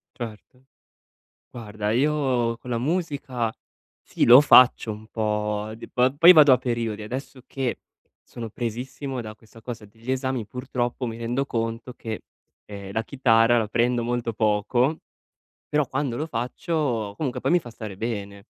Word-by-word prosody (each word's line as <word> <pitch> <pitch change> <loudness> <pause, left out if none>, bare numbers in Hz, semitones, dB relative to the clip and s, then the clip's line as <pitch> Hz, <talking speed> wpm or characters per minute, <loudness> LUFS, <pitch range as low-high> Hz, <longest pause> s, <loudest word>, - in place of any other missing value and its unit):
Certo. 120 +2 -9 0.9
Guarda, 105 -3 -4
io 130 -3 +1
con 125 - -11
la 120 - 0
musica 140 -5 -2 0.5
sì, - - -1
lo 125 +4 +9
faccio 125 -5 +6
un 110 +1 -9
po' 105 -1 -2
di 115 - -11
po 125 +1 +2
poi 170 +4 +9
vado 150 -5 +8
a - - +4
periodi. 115 -3 -3
Adesso 130 +3 -7
che 130 -3 -3 0.4
sono 115 -2 -8
presissimo 125 +4 -5
da 110 -1 -8
questa 110 +1 -18
cosa 115 -2 -7
degli 115 +4 -7
esami 130 -3 -2
purtroppo 125 +2 -3
mi 115 -1 -5
rendo 120 +4 -1
conto 115 0 -3
che, 110 -1 -6 0.4
ehm, 100 -2 -8
la 110 - -1
chitarra 120 -3 +3
la 110 -2 0
prendo 120 +2 +1
molto 120 -1 -2
poco, 115 +7 +1 0.7
però 150 -1 +1
quando 135 -3 -2
lo 155 - -2
faccio 125 -3 -2
comunque 135 -2 -3
poi - - 0
mi 175 - +5
fa 120 - -11
stare 110 -3 -8
bene 100 -3 -5
120 Hz, 155 wpm, -24 LUFS, 110-130 Hz, 0.9 s, lo